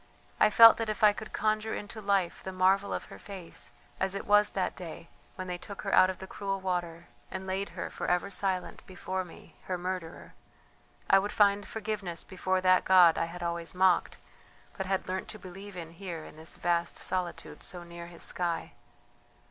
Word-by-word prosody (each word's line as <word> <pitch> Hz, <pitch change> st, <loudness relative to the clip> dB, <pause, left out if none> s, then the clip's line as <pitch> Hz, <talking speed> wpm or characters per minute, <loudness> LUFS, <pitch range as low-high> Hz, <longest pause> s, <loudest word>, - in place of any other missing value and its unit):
I 215 Hz, -, +6 dB
felt 230 Hz, +1 st, +9 dB
that 225 Hz, -1 st, -2 dB
if 215 Hz, +1 st, -3 dB
I 210 Hz, -1 st, +8 dB
could 215 Hz, +1 st, -8 dB
conjure 215 Hz, +1 st, 0 dB
into 210 Hz, +2 st, -7 dB
life 195 Hz, -4 st, +1 dB
the 190 Hz, -, -5 dB
marvel 190 Hz, +2 st, +3 dB
of -, -, -2 dB
her -, -, -11 dB
face 190 Hz, -4 st, -8 dB, 0.3 s
as 190 Hz, 0 st, 0 dB
it 200 Hz, -, -4 dB
was 205 Hz, 0 st, +5 dB
that 190 Hz, -, -2 dB
day 170 Hz, -2 st, -8 dB, 0.3 s
when 185 Hz, -, -5 dB
they 180 Hz, -1 st, -4 dB
took 200 Hz, +1 st, -8 dB
her -, -, -2 dB
out 185 Hz, -, +7 dB
of 190 Hz, -, -3 dB
the 190 Hz, -, -8 dB
cruel 195 Hz, 0 st, -3 dB
water 175 Hz, -3 st, -3 dB, 0.2 s
and 190 Hz, 0 st, -5 dB
laid 190 Hz, +1 st, -2 dB
her, -, -, -4 dB
for -, -, -4 dB
ever 180 Hz, +3 st, +1 dB
silent, 190 Hz, -2 st, -2 dB
before 185 Hz, 0 st, -3 dB
me, 175 Hz, -, -15 dB
her 185 Hz, -, -2 dB
murderer, 180 Hz, -2 st, -5 dB, 0.7 s
I 195 Hz, -, +7 dB
would 205 Hz, +2 st, -2 dB
find 205 Hz, -1 st, +3 dB
forgiveness 205 Hz, -6 st, -4 dB
before 185 Hz, 0 st, -1 dB
that 185 Hz, 0 st, +5 dB
God 180 Hz, -3 st, +7 dB
I -, -, 0 dB
had 175 Hz, +1 st, -7 dB
always 170 Hz, 0 st, -3 dB
mocked 185 Hz, -1 st, +3 dB, 0.6 s
but 190 Hz, -, -4 dB
had 190 Hz, 0 st, -1 dB
learnt 185 Hz, 0 st, -3 dB
to 215 Hz, -, -7 dB
believe 195 Hz, 0 st, -10 dB
in 165 Hz, -2 st, -7 dB
here 170 Hz, -2 st, -7 dB
in -, -, -12 dB
this 160 Hz, +1 st, -6 dB
vast 170 Hz, 0 st, 0 dB
solitude 180 Hz, -2 st, -3 dB
so 175 Hz, -1 st, -6 dB
near 170 Hz, 0 st, -9 dB
His 170 Hz, -1 st, -9 dB
sky! 175 Hz, -2 st, -1 dB
185 Hz, 195 wpm, -30 LUFS, 175-200 Hz, 0.7 s, felt